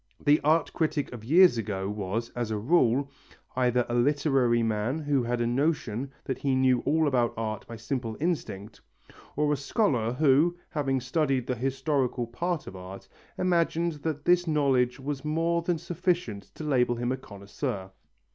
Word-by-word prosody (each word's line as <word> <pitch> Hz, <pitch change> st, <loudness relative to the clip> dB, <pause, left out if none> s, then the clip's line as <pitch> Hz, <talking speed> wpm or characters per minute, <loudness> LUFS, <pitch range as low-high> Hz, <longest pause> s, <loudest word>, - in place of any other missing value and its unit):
The 145 Hz, +1 st, +4 dB
art 155 Hz, +3 st, +2 dB
critic 155 Hz, -4 st, -1 dB
of 115 Hz, -3 st, -8 dB
years 165 Hz, +1 st, +5 dB
ago 95 Hz, -3 st, -3 dB
was, 105 Hz, +3 st, -3 dB
as 120 Hz, -2 st, -3 dB
a 110 Hz, -, -1 dB
rule, 135 Hz, +2 st, +2 dB, 0.4 s
either 125 Hz, -1 st, +2 dB
a 120 Hz, -, -4 dB
literary 130 Hz, -2 st, +2 dB
man 110 Hz, +5 st, 0 dB
who 145 Hz, -3 st, 0 dB
had 120 Hz, 0 st, -1 dB
a -, -, +1 dB
notion 135 Hz, -1 st, -1 dB
that 130 Hz, -, -4 dB
he 135 Hz, -2 st, +1 dB
knew 130 Hz, -1 st, +3 dB
all 155 Hz, +2 st, +3 dB
about 125 Hz, -4 st, +1 dB
art 110 Hz, -2 st, -4 dB
by 115 Hz, -, -7 dB
simple 115 Hz, -1 st, -4 dB
instinct, 115 Hz, -, -3 dB, 0.5 s
or 150 Hz, 0 st, +2 dB
a -, -, +2 dB
scholar 140 Hz, -, 0 dB
who, 155 Hz, +5 st, +3 dB
having 135 Hz, -3 st, 0 dB
studied 135 Hz, -1 st, 0 dB
the 125 Hz, -, -1 dB
historical 130 Hz, 0 st, -1 dB
part 165 Hz, +8 st, -3 dB
of 95 Hz, -, -9 dB
art, 95 Hz, +1 st, -9 dB, 0.3 s
imagined 170 Hz, -1 st, +1 dB
that 150 Hz, -2 st, -3 dB
this 175 Hz, 0 st, +3 dB
knowledge 135 Hz, -5 st, +2 dB
was 135 Hz, 0 st, -4 dB
more 165 Hz, +2 st, 0 dB
than 170 Hz, 0 st, 0 dB
sufficient 170 Hz, -, -2 dB
to -, -, -7 dB
label 125 Hz, -5 st, +2 dB
him 120 Hz, +1 st, -2 dB
a 130 Hz, -, -1 dB
connoisseur. 100 Hz, -2 st, -6 dB
130 Hz, 165 wpm, -27 LUFS, 120-155 Hz, 0.5 s, years